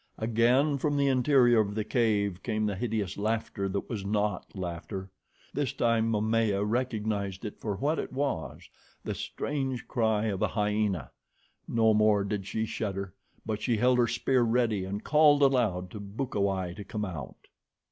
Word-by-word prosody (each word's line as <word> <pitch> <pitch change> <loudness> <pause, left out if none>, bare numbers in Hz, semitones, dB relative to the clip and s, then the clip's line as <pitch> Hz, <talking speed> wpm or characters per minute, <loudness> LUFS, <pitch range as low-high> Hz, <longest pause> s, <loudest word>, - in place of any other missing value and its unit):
Again, 120 +6 +2
from 145 +1 0
the 140 - +3
interior 130 -3 +4
of 105 -1 0
the 110 - 0
cave 105 -5 +1
came 110 -2 -1
the 105 - 0
hideous 105 -3 -2
laughter 110 -2 -1
that 100 +1 -3
was 110 -5 -4
not 105 -1 -1
laughter. 95 +2 -5 0.4
This 140 -3 -1
time 115 -1 +2
Momaya 110 -2 +1
recognized 110 -4 -2
it 105 - -6
for 105 -3 -3
what 145 +10 0
it - - -4
was, 135 - -3 0.4
the - - -3
strange 135 -4 -3
cry 110 -3 +1
of 100 -4 -2
a - - +3
hyena. 105 - -1 0.6
No 110 -1 +3
more 105 -1 +4
did 100 -1 -3
she 110 +2 -1
shudder, 100 -4 -4 0.3
but 105 -1 -3
she 120 -3 +1
held 125 +2 +3
her 120 - +4
spear 120 +2 +1
ready 115 -4 +1
and 100 +3 -4
called 150 -1 +5
aloud 105 -10 +2
to 105 - -7
Bukawai 100 -4 -2
to 105 - -6
come 105 +1 -4
out. 85 -7 -8
110 Hz, 165 wpm, -29 LUFS, 100-120 Hz, 0.6 s, called